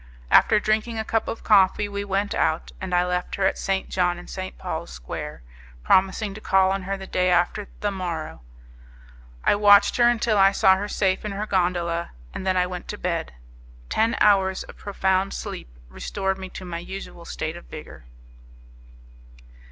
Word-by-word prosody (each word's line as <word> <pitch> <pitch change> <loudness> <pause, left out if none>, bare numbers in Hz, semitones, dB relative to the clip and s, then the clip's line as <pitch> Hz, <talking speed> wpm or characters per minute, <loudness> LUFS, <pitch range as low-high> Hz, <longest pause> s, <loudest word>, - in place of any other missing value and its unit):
After 215 - +6
drinking 215 +2 0
a 220 - -2
cup 225 0 0
of 225 - -5
coffee 205 0 +4
we 200 0 -4
went 200 +1 -1
out, 160 +1 0
and 190 -1 -5
I 180 0 +3
left 180 0 -2
her 195 - 0
at 190 - +1
St. 195 -1 -1
John 180 -1 0
and 175 - -11
St. 185 0 -6
Paul's - - -5
Square, - - -7 0.4
promising 195 - +2
to 215 - -10
call 190 -2 +3
on 195 0 -1
her 195 - -1
the 190 - -8
day 185 -1 +1
after 180 +3 +1
the 205 - 0
morrow; 170 - -5 1.0
I - - +4
watched 205 0 +5
her 240 -1 +5
until 225 -3 +1
I 195 0 +6
saw 190 -1 +5
her 200 +2 -3
safe 190 -2 0
in 210 -2 -4
her 205 +2 -3
gondola, 175 -3 -1 0.2
and 190 - -3
I - - +3
then 180 -1 +1
went 180 -1 -6
to - - -5
bed. - - -3 0.6
Ten 225 +1 +2
hours 190 -2 +3
of - - -13
profound 190 -1 0
sleep - - -6 0.2
restored 195 - -3
me 190 0 -7
to 185 - -9
my 170 -1 -5
usual 175 -1 -8
state - - -4
of - - -11
vigour. - - -11
190 Hz, 185 wpm, -24 LUFS, 180-205 Hz, 1.0 s, After